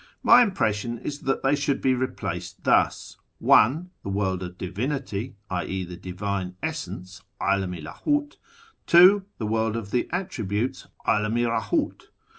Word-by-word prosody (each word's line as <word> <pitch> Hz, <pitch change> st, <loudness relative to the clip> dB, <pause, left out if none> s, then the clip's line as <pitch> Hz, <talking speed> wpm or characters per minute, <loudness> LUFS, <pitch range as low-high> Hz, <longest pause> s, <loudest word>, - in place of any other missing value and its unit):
My 245 Hz, -, +8 dB
impression 120 Hz, -, 0 dB
is 145 Hz, +4 st, -5 dB
that 135 Hz, -1 st, -1 dB
they 135 Hz, +1 st, +3 dB
should 140 Hz, -1 st, 0 dB
be 130 Hz, -, +2 dB
replaced 130 Hz, 0 st, -4 dB
thus: -, -, +2 dB
— -, -, -48 dB
1. 160 Hz, +11 st, +4 dB
The -, -, -5 dB
AVorld 95 Hz, -2 st, -1 dB
of 90 Hz, 0 st, -7 dB
Divinity 115 Hz, +4 st, -3 dB, 0.2 s
{i.e. 95 Hz, +1 st, -2 dB
the 90 Hz, 0 st, -8 dB
Divine 95 Hz, 0 st, -4 dB
Essence, 95 Hz, -, -5 dB, 0.2 s
'Alam 95 Hz, -2 st, 0 dB
i 85 Hz, -, -8 dB
LdMt); 290 Hz, -, -2 dB, 0.5 s
2. 190 Hz, +3 st, +7 dB
The 110 Hz, -, -3 dB
World 110 Hz, +1 st, 0 dB
of 105 Hz, -3 st, -6 dB
the 125 Hz, -, 0 dB
Attributes 130 Hz, -, -2 dB, 0.2 s
(^Alam 105 Hz, +2 st, +1 dB
i 120 Hz, -, +2 dB, 0.2 s
RclMt). -, -, -2 dB
110 Hz, 150 wpm, -25 LUFS, 95-140 Hz, 0.5 s, My